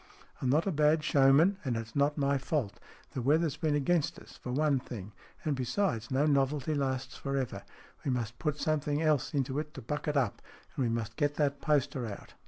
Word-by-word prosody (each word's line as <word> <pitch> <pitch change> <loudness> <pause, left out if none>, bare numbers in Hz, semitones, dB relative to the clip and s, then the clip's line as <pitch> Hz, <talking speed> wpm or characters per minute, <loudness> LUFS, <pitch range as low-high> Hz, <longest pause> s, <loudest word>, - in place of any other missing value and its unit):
"I'm 130 - +1
not 150 +5 +3
a 195 - +1
bad 150 0 +3
showman, 145 +8 +5
and 125 -4 -1
it's 115 0 -6
not 145 +1 +2
my 140 -1 +2
fault. 135 -6 -2 0.3
The 130 - -3
weather's 155 +4 +2
been 155 -3 0
against 150 +2 +1
us, - - -13
for 125 - -6
one 145 0 +2
thing. 110 -5 -8 0.3
And, 150 -2 +1
besides, 125 - -1
no 135 +3 +2
novelty 140 0 +1
lasts 135 -2 -2
for 140 0 -3
ever. 130 -2 -2 0.4
We - - -1
must 120 -2 -2
put 150 -3 -1
something 150 -1 0
else 150 -3 +2
into 135 0 0
it 150 0 -6
to 135 - -6
buck 150 +7 -3
it 150 -1 +1
up, 125 -7 0 0.3
and - - -2
we 120 - +1
must 115 -1 -3
get 145 0 +1
that 145 -2 0
poster 140 -5 +1
out." 100 - -9
140 Hz, 205 wpm, -31 LUFS, 130-150 Hz, 0.4 s, showman